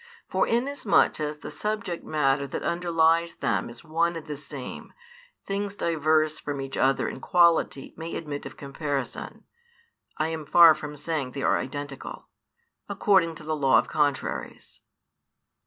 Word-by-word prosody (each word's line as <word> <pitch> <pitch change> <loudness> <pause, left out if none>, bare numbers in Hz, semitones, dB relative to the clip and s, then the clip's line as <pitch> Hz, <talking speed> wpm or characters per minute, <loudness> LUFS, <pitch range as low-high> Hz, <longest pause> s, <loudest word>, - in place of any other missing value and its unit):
For - - +1
inasmuch 240 -5 +2
as 150 0 -2
the - - -8
subject 200 +1 -3
matter 140 -2 +1
that - - -5
underlies 170 -1 +2
them - - -1
is 120 0 -11
one 165 +1 0
and 165 - -6
the 150 -2 -5
same, 140 -2 -8 0.5
things 200 0 -3
diverse 155 -3 +1
from 145 -1 -4
each 135 0 -5
other 135 +1 +2
in - - -5
quality 170 -6 +2
may 165 +1 -6
admit 145 -4 -5
of 135 - -12
comparison 140 -1 -4 0.7
(I 155 +1 0
am 160 -2 -5
far 170 0 +8
from 150 -1 -7
saying 145 -4 -3
they 140 - -4
are - - +3
identical) 140 +1 -7 0.6
according 190 -4 +3
to 155 - -11
the 155 0 -2
law 135 -3 +4
of - - +1
contraries. 145 -3 -2
155 Hz, 150 wpm, -26 LUFS, 140-170 Hz, 0.7 s, far